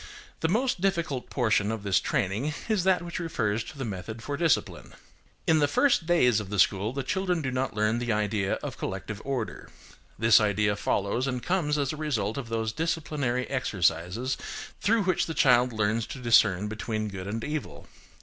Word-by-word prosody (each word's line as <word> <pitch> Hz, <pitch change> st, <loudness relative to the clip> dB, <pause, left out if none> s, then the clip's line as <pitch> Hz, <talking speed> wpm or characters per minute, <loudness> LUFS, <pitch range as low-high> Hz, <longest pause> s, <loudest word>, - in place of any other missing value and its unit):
The 160 Hz, -, +1 dB
most 235 Hz, 0 st, +1 dB
difficult 170 Hz, -9 st, -1 dB
portion 110 Hz, -4 st, +1 dB
of 110 Hz, -2 st, -4 dB
this 100 Hz, -2 st, +3 dB
training 130 Hz, +3 st, -1 dB
is 215 Hz, -5 st, +1 dB
that 185 Hz, -2 st, +3 dB
which 170 Hz, +1 st, -5 dB
refers 115 Hz, -10 st, -1 dB
to -, -, -10 dB
the 135 Hz, -, -3 dB
method 110 Hz, +2 st, -6 dB
for 145 Hz, -, -3 dB
discipline. 165 Hz, +1 st, 0 dB, 0.5 s
In 160 Hz, -1 st, +4 dB
the 145 Hz, -, +3 dB
first 170 Hz, -, +2 dB
days 125 Hz, -10 st, +4 dB
of 105 Hz, -3 st, -7 dB
the 105 Hz, -, -3 dB
school 100 Hz, +3 st, +3 dB
the 135 Hz, +1 st, -3 dB
children 180 Hz, -2 st, -1 dB
do 130 Hz, -, -1 dB
not 130 Hz, -2 st, -2 dB
learn 105 Hz, +2 st, +1 dB
the 120 Hz, -1 st, -1 dB
idea 105 Hz, -2 st, 0 dB
of -, -, -6 dB
collective 100 Hz, +3 st, -5 dB
order; 130 Hz, -5 st, -4 dB, 0.5 s
this 115 Hz, 0 st, +6 dB
idea 105 Hz, 0 st, +2 dB
follows 100 Hz, +5 st, 0 dB
and 125 Hz, -2 st, -3 dB
comes 170 Hz, -5 st, +1 dB
as 140 Hz, -1 st, 0 dB
a -, -, -7 dB
result 140 Hz, -6 st, -1 dB
of 120 Hz, -4 st, -7 dB
those 110 Hz, -1 st, -1 dB
disciplinary 150 Hz, -6 st, -1 dB
exercises 110 Hz, -1 st, 0 dB, 0.4 s
through 220 Hz, +1 st, +3 dB
which 185 Hz, -2 st, +1 dB
the 160 Hz, -, -4 dB
child 125 Hz, -1 st, +4 dB
learns 110 Hz, 0 st, 0 dB
to 135 Hz, -, -7 dB
discern 105 Hz, -5 st, +4 dB
between 110 Hz, 0 st, -3 dB
good 95 Hz, -2 st, -6 dB
and 110 Hz, +3 st, -3 dB
evil. 150 Hz, -, -5 dB
120 Hz, 185 wpm, -27 LUFS, 105-150 Hz, 0.5 s, this